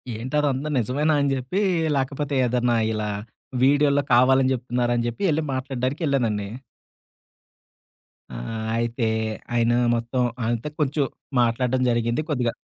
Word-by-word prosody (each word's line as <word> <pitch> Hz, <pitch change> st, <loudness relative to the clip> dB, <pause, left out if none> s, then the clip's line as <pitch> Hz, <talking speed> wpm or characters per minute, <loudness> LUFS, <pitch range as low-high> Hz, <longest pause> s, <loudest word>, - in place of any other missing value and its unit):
ఏంటదంత 135 Hz, +4 st, -1 dB
నిజమేనా? 140 Hz, +7 st, +1 dB
అని 140 Hz, -1 st, +1 dB
చెప్పి, 130 Hz, +10 st, -2 dB, 0.3 s
లేకపోతే 140 Hz, +1 st, -2 dB
ఏదన్నా 120 Hz, -1 st, +1 dB, 0.2 s
ఇలా 105 Hz, 0 st, -2 dB, 0.5 s
వీడియోలో 145 Hz, +1 st, +4 dB
కావాలని 130 Hz, +2 st, +5 dB
జేప్తున్నారా 120 Hz, 0 st, -1 dB
అని 120 Hz, -, 0 dB
జేప్పి, 120 Hz, -, -4 dB
ఎళ్లి 155 Hz, +1 st, 0 dB
మాట్లాడడానికేళ్ళానండి. 130 Hz, -, -1 dB, 1.9 s
ఆ! -, -, -6 dB, 0.4 s
అయితే, 115 Hz, 0 st, -1 dB, 0.5 s
ఆయన 115 Hz, 0 st, +3 dB, 0.2 s
మొత్తం 120 Hz, +2 st, -1 dB, 0.2 s
ఆయనతో 120 Hz, +4 st, -1 dB
కొంచెం, 145 Hz, -1 st, +1 dB, 0.4 s
మాట్లాడడం 125 Hz, +2 st, +1 dB
జరిగింది 120 Hz, +3 st, +1 dB
కొద్దిగా. 125 Hz, -5 st, 0 dB
130 Hz, 110 wpm, -24 LUFS, 120-140 Hz, 1.9 s, కావాలని